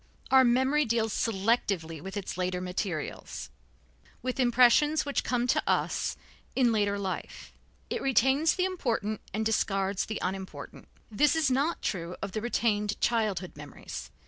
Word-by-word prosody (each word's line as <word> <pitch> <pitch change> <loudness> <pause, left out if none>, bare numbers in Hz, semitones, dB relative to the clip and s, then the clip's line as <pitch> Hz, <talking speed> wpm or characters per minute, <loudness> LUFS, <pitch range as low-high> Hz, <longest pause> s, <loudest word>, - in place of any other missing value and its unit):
Our 265 0 +7
memory 260 +5 +3
deals 225 -3 0
selectively 195 -7 0
with 190 +2 -6
its 200 - -4
later 180 0 -1
materials, 180 -3 -4 0.7
with 255 +1 -3
impressions 255 +5 +4
which 285 - -1
come 245 -1 0
to 250 - +2
us - - 0 0.4
in 250 -3 +4
later 205 -2 +1
life. 195 -2 -5 0.3
It - - -3
retains 270 +4 +3
the 365 - +1
important 230 - -2
and 220 +2 -2
discards 195 -3 0
the 215 - -3
unimportant. 190 +1 -6 0.2
This 290 +9 +3
is 310 -5 +2
not 280 +6 0
true 175 -2 -3
of 200 - -4
the 215 - -3
retained 210 -3 0
childhood 210 -6 0
memories. 130 - -8
220 Hz, 145 wpm, -29 LUFS, 190-255 Hz, 0.7 s, Our